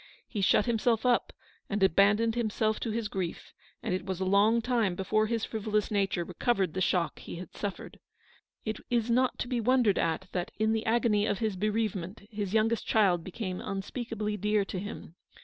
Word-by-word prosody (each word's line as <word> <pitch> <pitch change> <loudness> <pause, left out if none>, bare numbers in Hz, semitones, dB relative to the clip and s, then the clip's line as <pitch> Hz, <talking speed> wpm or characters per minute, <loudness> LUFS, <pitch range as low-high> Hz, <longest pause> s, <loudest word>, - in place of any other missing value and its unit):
He 210 - -3
shut 200 +2 +4
himself 230 0 +1
up 245 -1 +2 0.4
and 205 -1 0
abandoned 205 +5 +4
himself 220 -2 0
to 230 - -3
his 220 0 -1
grief, 185 -4 -5 0.3
and - - -1
it 185 - -2
was 190 -1 -4
a 190 - -1
long 205 +4 +4
time 230 -6 +1
before 215 +4 +1
his 230 -1 -1
frivolous 215 -1 -1
nature 195 -4 +1
recovered 185 0 0
the 185 - -2
shock 175 -3 +1
he - - -8
had 175 0 -9
suffered, 205 -2 -5 0.7
It 220 -1 -3
is 235 -1 +1
not 255 +2 +2
to - - -3
be 245 -2 -1
wondered 240 -4 +3
at 165 +3 -1
that, 180 -1 -2
in 220 +1 +2
the 225 0 -2
agony 220 -2 +2
of 200 - 0
his 215 -1 -1
bereave 215 +2 0
ment, 190 +3 -7
his 205 -3 -3
youngest 220 +1 +1
child 190 -6 +3
became 185 0 -5
unspeakably 210 +1 -3
dear 210 0 +1
to 190 - -4
him. 180 -3 -8
210 Hz, 190 wpm, -29 LUFS, 190-225 Hz, 0.7 s, shut